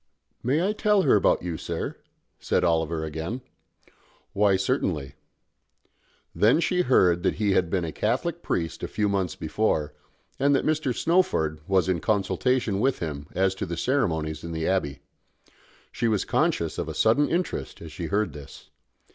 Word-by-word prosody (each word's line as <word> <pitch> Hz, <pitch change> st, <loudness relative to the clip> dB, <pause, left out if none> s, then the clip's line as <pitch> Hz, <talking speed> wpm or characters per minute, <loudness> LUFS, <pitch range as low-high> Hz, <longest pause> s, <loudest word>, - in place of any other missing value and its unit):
"I -, -, -41 dB
may 165 Hz, +10 st, +2 dB
tell 210 Hz, -2 st, +2 dB
her -, -, +5 dB
about 100 Hz, -, +3 dB
you, 85 Hz, -3 st, -3 dB
sir?" -, -, -4 dB, 0.4 s
said -, -, 0 dB
Oliver 80 Hz, -2 st, +1 dB
again. 80 Hz, -, -4 dB, 0.9 s
"Why, 100 Hz, -1 st, +3 dB
certainly." 95 Hz, -, -1 dB, 1.2 s
Then 115 Hz, +9 st, +4 dB
she 180 Hz, +1 st, +1 dB
heard 90 Hz, -, +3 dB
that 95 Hz, -, +1 dB
he 105 Hz, -2 st, +1 dB
had 90 Hz, -3 st, +2 dB
been 90 Hz, -2 st, 0 dB
a 80 Hz, -, -4 dB
Catholic 140 Hz, -, -1 dB
priest 80 Hz, -, -2 dB
a -, -, -3 dB
few 105 Hz, -, -1 dB
months 95 Hz, -3 st, -1 dB
before, 80 Hz, -3 st, -1 dB, 0.5 s
and 140 Hz, +1 st, +3 dB
that -, -, 0 dB
Mr. 155 Hz, -4 st, +1 dB
Snowford 120 Hz, -, +1 dB
was 95 Hz, -1 st, +2 dB
in 90 Hz, -2 st, +1 dB
consultation 105 Hz, +3 st, 0 dB
with 130 Hz, +4 st, +2 dB
him 75 Hz, -3 st, -5 dB
as 95 Hz, 0 st, +2 dB
to 95 Hz, -, -5 dB
the 85 Hz, 0 st, -4 dB
ceremonies 80 Hz, -, -1 dB
in 85 Hz, 0 st, -5 dB
the 80 Hz, 0 st, -2 dB
Abbey. 90 Hz, -7 st, -1 dB, 0.9 s
She 120 Hz, -, -1 dB
was 105 Hz, -3 st, +1 dB
conscious -, -, 0 dB
of -, -, -3 dB
a -, -, -6 dB
sudden 115 Hz, +7 st, +3 dB
interest 175 Hz, +2 st, -2 dB
as 80 Hz, -2 st, -9 dB
she 85 Hz, 0 st, -5 dB
heard 100 Hz, -4 st, 0 dB
this. 70 Hz, -1 st, -12 dB
95 Hz, 165 wpm, -26 LUFS, 80-130 Hz, 1.2 s, her